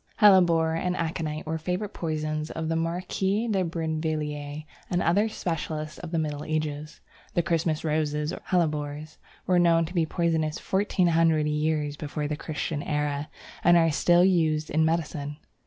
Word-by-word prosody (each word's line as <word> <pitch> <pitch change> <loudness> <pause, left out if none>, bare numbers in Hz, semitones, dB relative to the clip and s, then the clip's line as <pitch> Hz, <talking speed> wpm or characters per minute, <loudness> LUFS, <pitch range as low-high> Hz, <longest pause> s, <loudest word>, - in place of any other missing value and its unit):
Hellebore 175 -6 +5
and 180 +2 -1
Aconite 160 -1 -3
were 160 +1 -2
the 160 - -14
favourite 180 +4 -2
poisons 155 -1 -2
of 160 -1 -4
the 165 - 0
Marquise 190 +6 -1
de 190 -2 +2
Brinvilliers 155 -3 -3 0.2
and 175 - +1
other 200 +6 +2
specialists 155 -5 -4
of 175 - -7
the 165 - -1
Middle 150 -2 -2
Ages. 155 -1 -3 0.3
The 175 - +3
Christmas 160 -2 0
Roses 150 0 0
or - - -7
Hellebores 150 -3 -1 0.3
were 180 -1 +3
known 165 -1 +4
to 170 - -8
be 165 -3 +1
poisonous 160 -2 0
fourteen 190 -2 +1
hundred 160 -2 +3
years 150 -1 0
before 150 0 -3
the 150 - -2
Christian 155 0 -3
era, 150 0 -2 0.3
and 175 0 +6
are 165 -1 +4
still 175 +4 +4
used 160 -4 +2
in 160 +2 +3
medicine. 150 -3 -1
160 Hz, 160 wpm, -26 LUFS, 150-170 Hz, 0.3 s, and